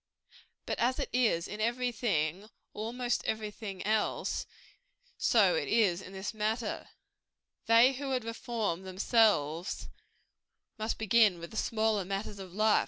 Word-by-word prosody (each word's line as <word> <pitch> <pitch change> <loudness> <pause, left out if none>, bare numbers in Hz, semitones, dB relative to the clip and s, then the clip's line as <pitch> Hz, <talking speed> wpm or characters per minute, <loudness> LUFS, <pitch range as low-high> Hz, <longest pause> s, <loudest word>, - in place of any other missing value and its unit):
But - - -3
as 250 +2 +2
it - - -3
is 225 -9 +2
in 210 +1 -6
every 245 +2 0
thing 190 -5 -1 0.3
or 215 - -4
almost 245 +1 -1
every 215 -1 -2
thing 200 -3 -7
else, 215 0 0 0.7
so - - +4
it - - -1
is 195 -6 +2
in 185 - -10
this 195 +3 -5
matter: 215 +1 -2 0.8
they 230 +4 +6
who 275 +1 -5
would 255 -3 0
reform 230 -6 -3
themselves, 185 - +1 0.9
must 220 +1 -2
begin 220 -3 +4
with 170 0 -9
the - - -10
smaller 220 -3 +1
matters 195 +2 -4
of 190 -2 -8
life. 215 +3 +3
215 Hz, 145 wpm, -31 LUFS, 190-230 Hz, 0.9 s, they